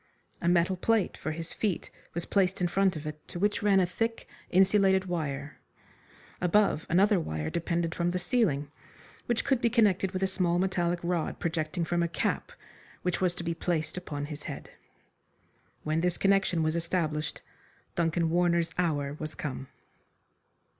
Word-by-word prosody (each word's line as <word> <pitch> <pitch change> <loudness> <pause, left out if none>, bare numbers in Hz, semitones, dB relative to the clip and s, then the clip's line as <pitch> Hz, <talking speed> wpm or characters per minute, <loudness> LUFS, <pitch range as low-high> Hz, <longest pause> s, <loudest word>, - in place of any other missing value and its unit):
A 170 - -1
metal 175 +1 +3
plate 220 +1 +1
for - - -4
his 165 +1 -4
feet 205 -5 -2 0.2
was 170 - -1
placed 190 -2 +1
in 180 - +2
front 190 0 +2
of 155 -1 -6
it, 150 0 -7
to - - -7
which 205 +5 +1
ran 200 -2 +4
a 185 - +4
thick, 225 +6 -2 0.2
insulated 190 0 +4
wire. 145 -5 -3 0.8
Above, 180 -2 +3
another 195 +3 +4
wire 80 - -3
depended 170 0 -1
from 175 -1 0
the 180 - -1
ceiling, 175 - +1 0.6
which 240 -2 0
could 265 -3 +2
be 235 - +3
connected 205 -5 +3
with 185 0 -3
a - - +3
small 180 -2 +1
metallic 175 -2 +1
rod 170 -2 -1
projecting 165 0 -1
from 175 +1 0
a 170 - +2
cap 170 - -2 0.5
which 180 0 -1
was 180 -2 +2
to - - -5
be 170 0 -1
placed 160 -1 -2
upon 150 -5 -4
his 150 0 -7
head. - - -7 1.1
When 155 +1 0
this 180 0 +1
connection 195 -4 +2
was 155 +1 +1
established 165 -3 -1 0.5
Duncan 165 -1 +1
Warner's 170 -1 +2
hour 145 -5 0
was 155 0 -5
come. 135 -2 -5
175 Hz, 165 wpm, -29 LUFS, 160-190 Hz, 1.1 s, ran